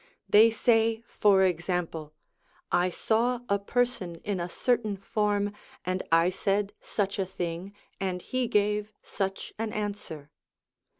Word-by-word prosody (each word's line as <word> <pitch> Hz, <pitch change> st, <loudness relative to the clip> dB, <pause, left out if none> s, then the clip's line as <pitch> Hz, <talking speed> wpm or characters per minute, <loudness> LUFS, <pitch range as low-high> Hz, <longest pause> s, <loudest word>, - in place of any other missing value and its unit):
They 220 Hz, +2 st, +7 dB
say, 225 Hz, -1 st, +2 dB
for 200 Hz, -4 st, +4 dB
example: 170 Hz, -3 st, -1 dB, 0.6 s
1 175 Hz, -, +4 dB
1 180 Hz, -, -1 dB
saw 235 Hz, +6 st, +1 dB
a 200 Hz, 0 st, +2 dB
person 200 Hz, -5 st, -1 dB
in 205 Hz, -3 st, -2 dB
a 170 Hz, +1 st, -3 dB
certain 220 Hz, -1 st, 0 dB
form, 205 Hz, 0 st, 0 dB, 0.3 s
and 185 Hz, +1 st, -1 dB
I 165 Hz, +2 st, +5 dB
said 200 Hz, +2 st, 0 dB
such 200 Hz, -1 st, -2 dB
a 190 Hz, -, +1 dB
thing, 175 Hz, +1 st, -4 dB, 0.3 s
and 185 Hz, -2 st, -2 dB
he 255 Hz, -1 st, -1 dB
gave 210 Hz, 0 st, +1 dB
such 195 Hz, -1 st, -3 dB
an 225 Hz, -1 st, -2 dB
answer.' 205 Hz, -9 st, -5 dB
200 Hz, 135 wpm, -28 LUFS, 180-215 Hz, 0.6 s, They